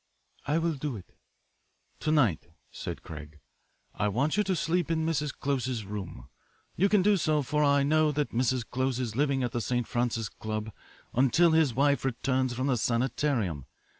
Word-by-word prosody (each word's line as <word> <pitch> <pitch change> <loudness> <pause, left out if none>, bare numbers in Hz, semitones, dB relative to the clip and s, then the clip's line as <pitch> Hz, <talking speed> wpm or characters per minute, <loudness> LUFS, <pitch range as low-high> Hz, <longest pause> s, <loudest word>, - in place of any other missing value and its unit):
"I 150 +2 +2
will 165 0 +1
do 145 -2 -4
it." 95 - -12 0.8
"To 155 - -1
night," 120 - +2 0.2
said - - -6
Craig, 75 -1 -9 0.6
"I 105 - 0
want 130 +9 +1
you 210 - +3
to 190 -1 +1
sleep 170 +1 0
in 160 -1 0
Mrs. 150 -3 0
Close's 130 -6 -2
room. 95 -4 -7 0.5
You 195 +4 +3
can 205 -2 +4
do 205 0 +4
so, 155 -4 +1
for 150 +3 0
I 140 -1 +4
know 155 +1 +3
that 145 0 -1
Mr. 125 0 0
Close 130 0 -1
is 115 -4 -3
living 140 -1 +1
at 120 - -1
the 120 - -2
St. 120 +1 -1
Francis 120 -2 -1
Club 110 +1 -5 0.4
until 135 +7 +4
his 160 -7 +3
wife 140 0 +2
returns 130 0 0
from 130 +2 -1
the 130 -3 +2
sanitarium. 115 - 0
130 Hz, 175 wpm, -29 LUFS, 115-150 Hz, 0.8 s, can